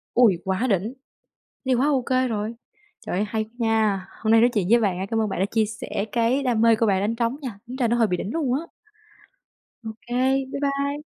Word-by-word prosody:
Ôi! 225 -8 +5
Quá 190 +6 0
đỉnh. 205 +5 0 0.7
Thì 260 - +3
quá 265 +4 +2
ô 275 -4 +2
kê 255 0 +1
rồi. 215 0 -3 0.5
Trời - - -2
ơi! 205 - +1
Hay 220 0 -1
nha. 220 -4 +1
Hôm 220 - 0
nay 225 - +6
nói 240 +2 +5
chuyện 205 -6 0
với 235 0 +6
bạn 190 -4 0
á, 190 - -3
cảm 225 -1 +1
ơn 215 - 0
bạn 190 - -3
đã 195 - +2
chia 225 -1 +2
sẻ 220 -2 -4
cái 240 +4 +2
đam 245 -4 +1
mê 230 -1 +5
của 225 +1 +1
bạn 190 -2 +2
đánh 210 +3 0
trống 235 +3 0
nha, 240 -8 -6
tính 250 +2 -7
ra 250 -3 +1
nó 235 - +2
hơi 230 -2 +3
bị 180 - -1
đỉnh 195 +5 -4
luôn 285 -7 0
á. 280 - 0 1.3
Ô - - -3
kê, 260 +2 +1
bye 280 - -4
bye. 280 +1 -1
230 Hz, 245 wpm, -24 LUFS, 210-255 Hz, 1.3 s, nay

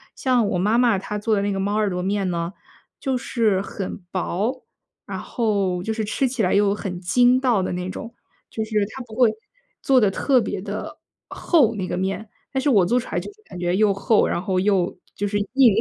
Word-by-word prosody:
像 250 -5 +2
我 180 - 0
妈 210 +5 +2
妈 235 -6 +3
她 210 +1 -4
做 215 +1 +1
的 200 - +1
那 200 0 0
个 195 - -2
猫 200 +2 -1
耳 215 -2 +2
朵 180 -1 -3
面 195 -1 0
呢， 170 +1 -2 0.5
就 265 -2 0
是 225 -6 +1
很 195 -1 -5
薄， 205 +7 -2 0.4
然 - - -5
后 200 -6 -1
就 220 - -2
是 220 -1 -2
吃 245 +5 0
起 255 -2 -1
来 185 - +2
又 200 0 +3
很 185 -3 -5
筋 245 +7 +4
道 245 -7 +2
的 185 - -2
那 180 +1 -3
种， 230 +5 -7 0.3
就 220 - -3
是 215 -2 0
她 265 - -6
不 225 - -14
会 245 -3 +5 0.5
做 265 -2 +4
得 210 -4 +4
特 255 +6 +2
别 - - -3
的 - - -6 0.3
厚， 260 - +2
那 190 -3 -3
个 180 - -3
面， 195 +3 -3 0.2
但 265 - 0
是 290 - +1
我 205 -9 +5
做 240 +7 +2
出 250 - -3
来 - - 0
就 - - -7
是 430 - -27
感 180 - -10
觉 175 0 0
又 205 0 +3
厚， 210 +3 +3
然 - - -1
后 185 0 -1
又 190 -3 +1 0.2
就 205 - -2
是 205 +1 -1 0.2
硬。 260 -6 +6
210 Hz, 245 characters per minute, -23 LUFS, 190-240 Hz, 0.5 s, 硬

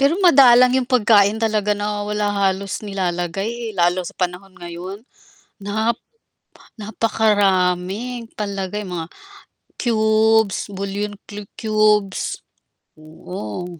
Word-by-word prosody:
Pero 280 +5 +3
madalang 255 -5 +7
yung 260 -1 0
pagkain 215 -4 +4
talaga 215 -2 0
nawawala 205 0 -2 0.2
halos 195 +1 -3
nilalagay, 195 +3 -3
eh, - - -4
lalo 175 +1 +2
sa 180 - -8
panahon 185 +2 -4
ngayon 180 +5 -8 0.5
nap 220 +3 -1 0.8
napakaraming 205 +1 0
palagay 200 0 -4
mga 170 -2 -5 0.7
cubes, 220 -2 +2
bouillon 200 +1 -4
cu 205 -1 -8 0.2
cubes, 215 -3 +1 0.6
oo 155 - -7
205 Hz, 95 wpm, -20 LUFS, 190-220 Hz, 0.8 s, madalang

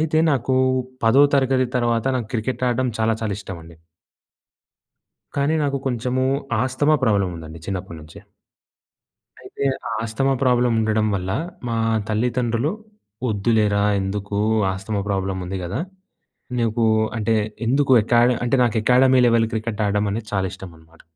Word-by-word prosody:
అయితే 155 0 +1
నాకు 130 -1 0 0.5
పదో 130 +5 +6
తరగతి 130 -1 +2
తర్వాత 120 -1 0
నాకు 120 -3 -3
క్రికెట్ 125 +3 -2
ఆడడం 125 +1 0
చాలా 110 0 +2
చాలా 110 -2 -2
ఇష్టమండి. 85 -5 -10 1.6
కానీ 140 +3 +1
నాకు 140 -1 -1
కొంచెమూ 125 +1 -1 0.4
ఆస్తమా 145 +4 +2
ప్రాబ్లమ్ 100 -5 +1
ఉందండి 80 0 -9
చిన్నప్పటి 90 -4 -5
నుంచే. 75 +2 -13 1.2
అయితే, - - -6 0.2
ఆ - - -4
ఆస్తమా 125 +5 0
ప్రాబ్లమ్ 125 -2 +3
ఉండడం 110 0 +1
వల్ల. 95 -1 -3 0.4
మా 115 - -1 0.3
తల్లిదండ్రులు, 120 +4 0 0.6
"వద్దులేరా 105 -1 +1 0.2
ఎందుకు 100 +1 -3 0.3
ఆస్తమ 95 +2 -3
ప్రాబ్లమ్ 95 -1 -2
ఉంది 95 +1 -4
కదా! 95 - -3 0.8
నీకు" 115 0 +1 0.3
అంటే 110 +1 +1 0.3
ఎందుకు 135 +1 +2
అకాడ 120 +1 +4 0.2
అంటే 120 +3 +2
నాకు 115 -2 +1
అకాడమీ 130 +2 +5
లెవెల్ 115 -1 +3
క్రికెట్ 110 -1 -2
ఆడ్డం 105 +1 0
అనేది 110 +1 -4
చాలా 95 -1 +1
ఇష్టం 95 -2 -9
అనమాట. 80 0 -21
115 Hz, 135 wpm, -21 LUFS, 100-125 Hz, 1.6 s, పదో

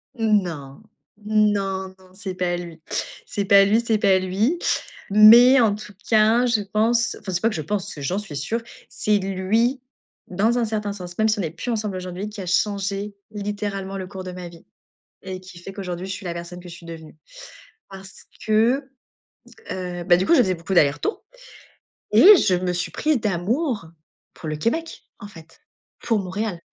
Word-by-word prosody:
Non. 180 - -1 0.4
Non, 200 -3 0
non, 185 -1 -21
c'est 190 -1 -6
pas 180 -1 -1
lui. 170 -2 -9 0.5
C'est 200 - -3
pas 200 -1 +6
lui, 215 +4 +3
c'est 230 -2 +1
pas 195 -2 +3
lui. 205 - 0 0.5
Mais 230 +6 +8
en 225 -4 +4
tout 210 0 -9
cas, 225 +2 +4
je 235 -3 +1
pense, 225 +4 +1
enfin, 190 - -6
c'est 180 0 -1
pas 225 - +3
que - - -5
je 160 - -2
pense, 200 +4 -3
c'est 145 - -9
j'en 180 +9 -1
suis 195 -9 -8
sûre, 220 +12 -2 0.3
c'est 210 -1 +1
lui, 205 +7 0 0.5
dans 215 +6 +1
un 235 - +1
certain 210 -2 -3
sens, 180 -3 -9
même 220 - +3
si 215 -1 +1
on - - 0
n'est 165 - -2
plus 205 +9 -5
ensemble 215 -3 -2
aujourd'hui, 185 +3 -5
qui 210 -1 -8
a - - -6
changé 200 +2 -1 0.2
littéralement 205 -2 -4
le 190 - -5
cours 190 0 -8
de 185 - -6
ma 180 -1 -8
vie 170 -1 -16 0.6
et 185 -1 -6
qui 185 -1 -13
fait 180 - -9
qu'aujourd'hui, 185 -2 -6
je - - -5
suis 195 0 -7
la 175 - -3
personne 170 +1 -8
que 180 - -12
je 170 - -9
suis 170 0 -13
devenue, 160 -2 -10 0.7
parce 195 0 -11 0.2
que, 235 +6 +2 0.8
heu, 180 -1 -5
bah, 175 -1 +5
du 180 - 0
coup, - - +3
je - - +5
faisais 190 -7 +3
beaucoup 170 +2 -7
d'aller-retours 145 - +1 0.9
et 415 0 +9
je 190 - +2
me 180 0 -1
suis 175 -1 -2
prise 305 -4 0
d'amour 215 - -1 0.5
pour - - -9
le 155 - -2
Québec, 320 - -2 0.2
en 205 - -9
fait, 165 -5 -16 0.4
pour 225 -3 0
Montréal. 195 0 -4
195 Hz, 190 wpm, -22 LUFS, 180-215 Hz, 0.9 s, et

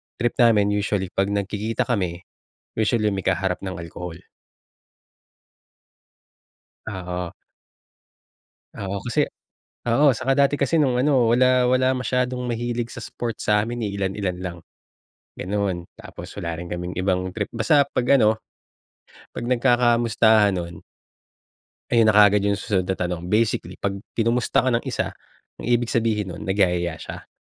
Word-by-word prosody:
trip 120 0 0
namin 105 -4 +5
usually 100 -2 -1
'pag 95 0 0
nagkikita 105 +4 -1
kami, 90 -7 -2 0.6
usually 110 -1 +2
may 95 -2 -3
kaharap 95 0 0
ng 95 -1 -5
alcohol. 85 0 -7 2.7
Oo. 90 -3 -5 1.4
Oo 100 0 -4
kasi 120 - +1 0.7
oo 130 +6 +4
saka 130 +4 0
dati 140 +1 +3
kasi 140 +3 0
nung 125 -4 +2
ano 130 -4 +3
wala 125 0 +4
wala 130 +1 +3
masyadong 125 0 -1
mahilig 120 0 -2
sa - - -9
sports 115 -2 -5
sa'min, 105 +3 +1
eh, 100 - -3
ilan 95 -1 -1
ilan 90 -3 -2
lang 85 -2 -5 0.8
ganoon. 95 -2 -2
Tapos - - -10
wala 85 -1 -3
rin 85 - -6
kaming 90 +1 -4
ibang 95 -1 0
trip. 105 -2 -3
Basta 135 +5 +3
'pag 125 -3 -2
ano, 110 -1 +3 1.0
pag - - -4
nagkakamustahan 120 -4 +3
nun 85 -1 -5 1.2
ayon 115 -2 +5
na 105 - +2
kaagad 105 -1 +6
yung 100 0 +1
susunod 95 -3 -1
na 95 - 0
tanong. 90 -1 -3
Basically, 110 -1 0
'pag 100 0 -2 0.2
kinumusta 115 +2 +2
ka - - +3
ng 115 - +1
isa, - - -2 0.5
ang - - -6
ibig 120 -1 +1
sabihin 105 -5 0
nun - - -8
nagyayaya 90 -4 0
siya. - - -9
105 Hz, 140 wpm, -23 LUFS, 95-120 Hz, 2.7 s, kaagad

